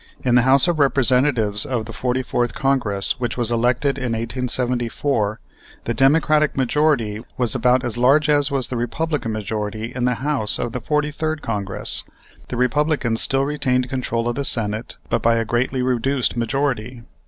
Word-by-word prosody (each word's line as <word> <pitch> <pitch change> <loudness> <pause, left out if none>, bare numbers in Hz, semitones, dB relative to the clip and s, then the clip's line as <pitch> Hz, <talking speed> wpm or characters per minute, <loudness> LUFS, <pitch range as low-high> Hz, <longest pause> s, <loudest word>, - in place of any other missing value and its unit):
In 125 - +1
the 125 - +5
House 130 +5 +6
of 170 -3 0
Representatives 125 -5 +2
of 120 -4 -3
the 115 - -9
44th 125 -1 -2
Congress, 125 -7 0
which 120 -1 -3
was 120 -2 0
elected 125 +4 0
in 125 -3 -2
1874, 120 -1 -2 0.4
the 120 - -2
Democratic 150 +4 +2
majority 130 -5 +1 0.2
was 125 -3 +1
about 125 +1 +2
as 120 -1 -2
large 140 +5 +4
as 145 -1 +2
was 135 -3 -1
the 125 - -3
Republican 125 +2 -2
majority 110 +1 -4
in 125 -1 -2
the 125 -1 +1
House 130 -5 0
of 120 - -3
the 125 - -5
43rd 150 +3 -2
Congress. 100 -4 0 0.4
The 125 - -5
Republicans 125 -2 0
still 135 0 +2
retained 130 -4 -1
control 120 -3 -2
of 120 - 0
the 140 - -3
Senate, 110 -3 +2
but - - +1
by 115 0 +3
a 115 0 -1
greatly 125 +3 -1
reduced 130 +1 0
majority. 120 0 -2
125 Hz, 165 wpm, -20 LUFS, 115-140 Hz, 0.4 s, House